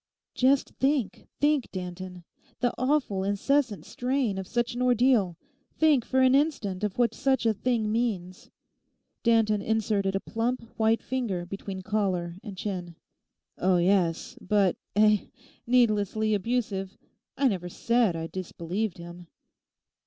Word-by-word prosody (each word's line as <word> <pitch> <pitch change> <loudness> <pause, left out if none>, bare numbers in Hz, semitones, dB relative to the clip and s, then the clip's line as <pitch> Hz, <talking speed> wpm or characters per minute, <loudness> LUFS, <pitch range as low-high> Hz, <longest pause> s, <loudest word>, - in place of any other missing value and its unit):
'Just 265 +2 +3
think, 270 -5 0
think, 290 -3 +2
Danton—the 180 +5 -6
awful, 255 -8 0
incessant 215 +4 0
strain 250 -5 -1
of 190 - -6
such 240 +2 -1
an 245 - -4
ordeal. 245 -8 +3 0.4
Think 300 -6 +4
for 260 - +2
an 260 0 +5
instant 270 -10 +1
what 240 -1 +2
such 265 -3 +1
a 225 - +4
thing 220 0 0
means!' 200 -6 -2 0.7
Danton 225 -3 +3
inserted 205 -3 0
a - - +1
plump, 230 +4 -2
white 225 0 +2
finger 225 -9 -2
between 190 0 -6
collar 185 -4 -1
and 200 -3 -8
chin. 180 -4 -4 0.6
'Oh 185 0 +3
yes. 185 +6 +1
But—eh?—needlessly 215 +2 +1
abusive? 205 -2 -2 0.4
I 275 - +3
never 180 -4 -3
said 230 -1 +1
I 165 0 -3
disbelieved 185 +3 -4
him. 175 0 -10
215 Hz, 120 wpm, -27 LUFS, 185-245 Hz, 0.7 s, an